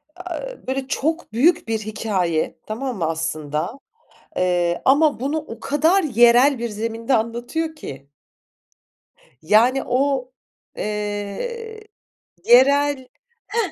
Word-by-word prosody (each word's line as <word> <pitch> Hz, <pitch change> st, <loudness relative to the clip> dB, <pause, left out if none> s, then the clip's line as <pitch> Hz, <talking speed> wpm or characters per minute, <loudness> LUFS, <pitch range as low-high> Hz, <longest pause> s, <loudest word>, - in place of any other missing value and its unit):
Aaa, 360 Hz, -1 st, -6 dB
e -, -, -19 dB
böyle, 265 Hz, 0 st, -2 dB
çok 320 Hz, -3 st, -2 dB
büyük 315 Hz, +5 st, +3 dB
bir 225 Hz, -1 st, -1 dB
hikâye, 195 Hz, -6 st, -2 dB
tamam 240 Hz, +1 st, -4 dB
mı, 165 Hz, -, -1 dB
aslında? 160 Hz, -, -3 dB, 0.6 s
Eee, 175 Hz, -1 st, +1 dB
ama 285 Hz, 0 st, +4 dB
bunu 280 Hz, +5 st, -1 dB
o 265 Hz, -7 st, -7 dB
kadar 320 Hz, +7 st, +2 dB
yerel 240 Hz, +1 st, +5 dB
bir 235 Hz, -1 st, -2 dB
zeminde 230 Hz, +4 st, -3 dB
anlatıyor 240 Hz, +8 st, -2 dB
ki. 140 Hz, -, -9 dB, 1.3 s
Yani, 230 Hz, +9 st, +3 dB
o, 260 Hz, 0 st, 0 dB, 0.4 s
eee, 210 Hz, -, -4 dB, 0.6 s
yerel 275 Hz, +1 st, +4 dB, 0.4 s
Heh, 420 Hz, -4 st, -1 dB
245 Hz, 110 wpm, -21 LUFS, 210-290 Hz, 1.3 s, yerel